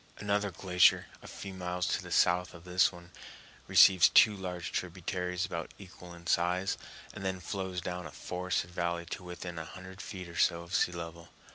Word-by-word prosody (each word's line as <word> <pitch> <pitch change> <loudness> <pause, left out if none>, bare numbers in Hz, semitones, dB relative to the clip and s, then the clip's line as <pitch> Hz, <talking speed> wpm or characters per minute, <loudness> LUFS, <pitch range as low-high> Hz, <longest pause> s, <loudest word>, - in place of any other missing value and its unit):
Another 105 0 0
glacier, 90 -1 +4 0.2
a - - -12
few 100 -1 -8
miles 90 -1 -2
to - - 0
the - - -10
south 90 +1 +3
of 85 - -12
this 90 0 +3
one, 85 -1 -14 0.6
receives 95 -3 +7
two 110 -2 +6
large 90 -3 -5
tributaries 90 0 -2
about 85 -1 -5
equal 90 -2 -12
in 85 0 -14
size, 90 +3 +1 0.4
and 100 - -8
then 95 -1 -2
flows 95 -1 -4
down 90 0 -4
a - - -11
forested 90 -1 -3
valley 85 -1 -2
to 90 - -6
within 90 -1 -6
a - - -4
hundred 95 +3 -10
feet 95 -4 -7
or 85 - -9
so 85 0 +2
of 85 +2 -11
sea 95 -3 +3
level. 85 -1 -8
90 Hz, 185 wpm, -31 LUFS, 85-95 Hz, 0.6 s, receives